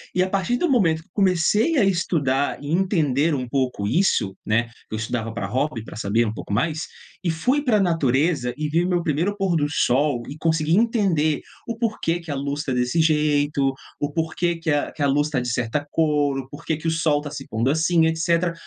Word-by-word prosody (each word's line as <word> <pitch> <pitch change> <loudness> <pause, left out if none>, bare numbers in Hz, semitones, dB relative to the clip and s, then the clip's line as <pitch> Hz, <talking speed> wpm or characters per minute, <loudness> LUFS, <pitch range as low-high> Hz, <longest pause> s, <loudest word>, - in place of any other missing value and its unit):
E, 180 - +4
a 185 - -2
partir 195 +6 0
do 350 - +1
momento 165 - +2
que - - -34
eu - - -63
comecei 205 - +2
a 245 - +4
estudar 150 -7 0
e 145 - -4
entender 160 -5 +2
um 130 -2 -3
pouco 125 -5 -1
isso, 110 - +1
né, 115 +2 +1 0.2
eu 110 - -3
estudava 115 0 -3
por 110 -3 -5
hobby, 130 +2 -2
para 110 - -10
saber 110 +2 +1
um 105 - -2
pouco 110 - -8
mais, 155 +9 0 0.5
fui 250 - +1
para 250 -7 +2
a - - +2
natureza, 150 -5 +1
vi 155 +3 0
o 180 - -1
meu 175 -2 +1
primeiro 170 +7 0
pôr 195 -3 +1
do 145 -2 +1
sol 135 -2 +1
e 140 - -6
consegui 160 0 +1
entender 195 - +2 0.3
o 230 -1 -4
porquê 215 -7 -1
que 165 -3 -8
a - - -2
luz 140 +2 -3
tá 140 - -3
desse 125 +6 +1
jeito, 145 -3 +2 0.3
o 145 0 -2
porquê 165 +2 -1
que 165 -1 -2 0.2
que - - -7
a - - +4
luz 145 +2 +2
estar 145 -5 -1
de 125 - -3
certa 125 +4 -1
cor, 145 -3 +1
o 130 0 -8
porquê 150 +2 -3
de 160 +2 -5
o - - +2
Sol 160 -2 +2
estar 145 0 -6
se 140 -2 -7
pondo 115 +4 0
assim, 160 +2 +3
etcétera. 170 +1 +1
155 Hz, 215 wpm, -23 LUFS, 135-170 Hz, 0.5 s, E